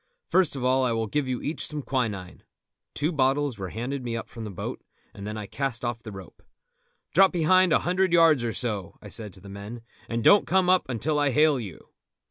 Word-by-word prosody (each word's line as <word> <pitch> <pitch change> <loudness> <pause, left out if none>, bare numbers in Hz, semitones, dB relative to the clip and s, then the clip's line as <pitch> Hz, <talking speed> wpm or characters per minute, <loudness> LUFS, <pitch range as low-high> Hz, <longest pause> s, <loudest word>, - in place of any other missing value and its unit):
First 185 -5 +2
of 130 - -4
all 130 +1 +3
I 125 -2 +1
will 115 0 -1
give 145 +5 -1
you 125 -1 -3
each 155 - -2
some 150 -2 -4
quinine." 105 -10 -3 0.5
Two 150 +4 0
bottles 135 - +1
were 95 -1 -4
handed 125 +6 -4
me 115 -1 -3
up 115 - -7
from 115 -1 -8
the - - -5
boat, 95 - -6 0.3
and 100 +1 -8
then 105 +1 -5
I 105 - -5
cast 125 +1 -3
off 120 -1 -3
the 110 - -9
rope. 95 -6 -11 0.7
"Drop 195 +1 +6
behind 180 +1 +4
a - - +6
hundred 185 +1 +2
yards 165 -6 +5
or 115 - -1
so," 105 -6 -3
I 105 - -11
said 105 -1 -5
to 95 - -13
the 100 - -12
men, 100 +4 -8 0.3
"and 115 0 -2
don't 205 - +6
come 185 0 +3
up 185 -7 +2
until 150 +5 -1
I 145 -1 +2
hail 150 +1 +3
you." 95 -9 -9
125 Hz, 225 wpm, -26 LUFS, 110-150 Hz, 0.7 s, Drop